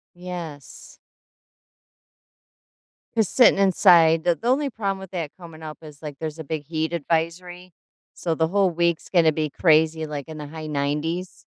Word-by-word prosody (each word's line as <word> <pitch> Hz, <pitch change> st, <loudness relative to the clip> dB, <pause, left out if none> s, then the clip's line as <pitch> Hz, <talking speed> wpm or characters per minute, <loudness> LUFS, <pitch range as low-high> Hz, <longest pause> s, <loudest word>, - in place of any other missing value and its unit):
Yes. 175 Hz, -5 st, -9 dB, 2.2 s
Just 220 Hz, -4 st, 0 dB
sitting 245 Hz, -5 st, +6 dB
inside. 165 Hz, -4 st, +5 dB
The 175 Hz, -1 st, +2 dB
the 230 Hz, -, -6 dB
only 275 Hz, +3 st, +2 dB
problem 200 Hz, -5 st, -3 dB
with 190 Hz, -2 st, -10 dB
that 165 Hz, -6 st, -4 dB
coming 165 Hz, -3 st, -12 dB
up 155 Hz, -1 st, -8 dB
is, 150 Hz, -2 st, -13 dB
like, 150 Hz, -3 st, -7 dB
there's 160 Hz, 0 st, -5 dB
a -, -, -5 dB
big 155 Hz, 0 st, -4 dB
heat 160 Hz, +2 st, -2 dB
advisory, 170 Hz, +3 st, -3 dB, 0.4 s
so 165 Hz, -2 st, -2 dB
the 160 Hz, 0 st, +1 dB
whole 195 Hz, +2 st, +2 dB
week's 170 Hz, -1 st, 0 dB
gonna 165 Hz, -4 st, +4 dB
be 155 Hz, 0 st, -1 dB
crazy, 160 Hz, 0 st, +3 dB
like, 145 Hz, -3 st, -6 dB
in 155 Hz, -, -7 dB
the 150 Hz, -1 st, -7 dB
high 155 Hz, +1 st, -8 dB
90s 150 Hz, +5 st, -3 dB
165 Hz, 160 wpm, -23 LUFS, 155-180 Hz, 2.2 s, sitting